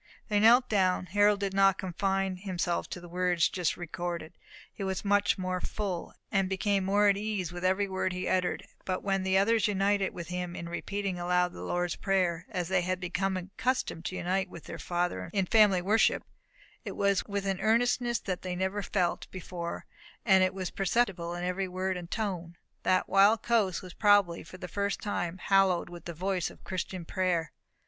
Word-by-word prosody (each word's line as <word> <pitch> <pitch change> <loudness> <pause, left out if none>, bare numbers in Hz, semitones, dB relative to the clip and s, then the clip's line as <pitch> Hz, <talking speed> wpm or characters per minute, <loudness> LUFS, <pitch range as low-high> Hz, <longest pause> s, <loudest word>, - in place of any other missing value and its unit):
They 205 -1 +3
knelt 240 +4 +6
down. 185 -3 +2
Harold 205 +2 +3
did 195 -1 -1
not 195 -1 +4
confine 190 +1 -1
himself 180 -2 -2
to - - -5
the 175 - -11
words 180 -1 +2
just 180 -3 -1
recorded; 175 -1 -5 0.4
he 200 - -6
was 190 +1 -3
much 205 0 +3
more 185 -1 -2
full, 195 -5 -4 0.2
and 195 -1 +1
became 195 0 +1
more 205 +2 +4
at 200 -1 +4
ease 205 -5 -2
with 175 0 -6
every 190 +2 +2
word 190 -1 -1
he 185 0 -3
uttered; 185 -1 0 0.2
and 185 -1 -1
when 195 -1 +1
the 190 0 +2
others 220 +1 +3
united 200 -1 +1
with 170 -2 -7
him 180 -1 -4
in 170 - -6
repeating 195 +2 -3
aloud 180 0 +1
the - - -9
Lord's 175 0 -1
Prayer, 180 -3 0
as 180 -6 -2
they 190 0 +2
had 185 +1 -1
been 180 -1 -5 0.3
accustomed 205 -4 -2
to 185 - -3
unite 185 +2 -1
with 170 - -10
their 165 - -8
father 175 - -2
in 195 -2 +1
family 195 -3 +4
worship, 215 +4 +3 0.6
it - - -6
was 200 -1 +2
with 200 -1 -2
an 195 -1 -1
earnestness 240 +1 +2
that 185 -2 -3
they 180 -1 -4
never 190 +3 -1
felt 180 -3 -1
before, 175 -2 -6 0.4
and 190 -4 +6
that 185 0 +1
was 185 -2 -3
perceptible 190 -4 0
in 175 - -4
every 180 +2 -1
word 185 +1 -2
and 175 -1 -7
tone. 180 -6 -3 0.2
That 185 0 +2
wild 205 +3 +5
coast 215 -6 +1
was 180 -1 -9
probably 205 -5 +4
for 185 - -11
the 180 - -7
first 200 +3 -2
time 175 -4 -3
hallowed 190 -2 +2
with 175 -1 -10
the 170 - -6
voice 185 0 -1
of - - -16
Christian 185 -1 -4
prayer. 175 -3 0
185 Hz, 190 wpm, -29 LUFS, 180-200 Hz, 0.6 s, knelt